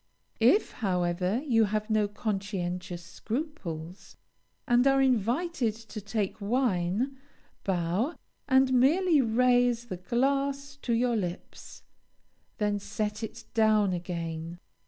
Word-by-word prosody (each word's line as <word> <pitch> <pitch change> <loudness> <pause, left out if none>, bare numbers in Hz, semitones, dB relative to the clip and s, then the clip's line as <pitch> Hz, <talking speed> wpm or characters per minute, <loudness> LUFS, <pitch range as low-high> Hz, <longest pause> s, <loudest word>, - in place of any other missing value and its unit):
If, 255 - +4
however, 180 +2 0
you 225 -6 +4
have 215 +1 -2
no 215 -1 +3
conscientious 190 -4 -3
scruples, 185 - -6 0.5
and 245 +2 +4
are 270 0 +4
invited 255 - +1
to 220 -1 -9
take 205 0 -3
wine, 230 +2 0 0.4
bow, 190 - 0 0.3
and 265 -1 +4
merely 305 +5 +4
raise 245 0 +3
the 185 -6 -5
glass 275 +7 0
to 245 -4 -2
your 240 +1 +2
lips, 180 -4 -6 0.7
then 210 -2 0
set 210 +1 -3
it 220 - -7
down 215 -3 +3
again. 170 -1 -4
220 Hz, 110 wpm, -28 LUFS, 185-255 Hz, 0.7 s, If